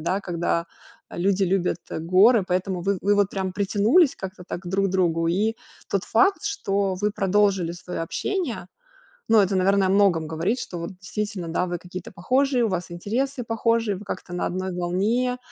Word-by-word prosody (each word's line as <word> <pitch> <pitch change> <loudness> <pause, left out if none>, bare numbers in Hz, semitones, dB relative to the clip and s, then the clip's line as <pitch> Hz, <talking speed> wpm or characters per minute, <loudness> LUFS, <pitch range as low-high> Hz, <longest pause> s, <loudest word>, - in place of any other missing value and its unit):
да. 180 +5 -1
Когда, 170 -2 -1 0.4
э, - - -9
люди 195 +2 +1
любят, 180 -2 0
э, - - -3
горы, 190 +6 +5
поэтому 185 0 -1
вы 195 +1 0
вы 205 +1 +3
вот 205 -1 +2
прям 190 -1 -3
притянулись 205 - +3
как-то 190 -1 -8
так - - -4
к 175 - -7
друг 195 +2 +1
другу 170 -3 +1
и 210 +6 +1 0.3
тот 200 -1 -1
факт, 385 - +3
что 200 - -1
вы 205 +3 0
продолжили 195 -3 +1
свое 175 0 -6
общение, 285 - -3 0.6
ну, 225 - +6
это, 195 -1 +2
наверно, 195 +1 +3
о - - 0
многом 190 -5 +3
говорит, 165 +9 -1
что 175 - -6
вот 170 - -5
действительно, 205 -3 -4
да, 170 +2 0
вы 175 0 -3
какие-то 180 0 -8
похожие, 255 +7 +1
у - - 0
вас 180 -2 -3
интересы 245 +9 -2
похожие, 225 -2 0
вы 205 - -11
как-то 185 -2 -6
на 175 - -1
одной 185 +1 -3
волне. 205 +9 0
195 Hz, 185 wpm, -24 LUFS, 180-210 Hz, 0.6 s, ну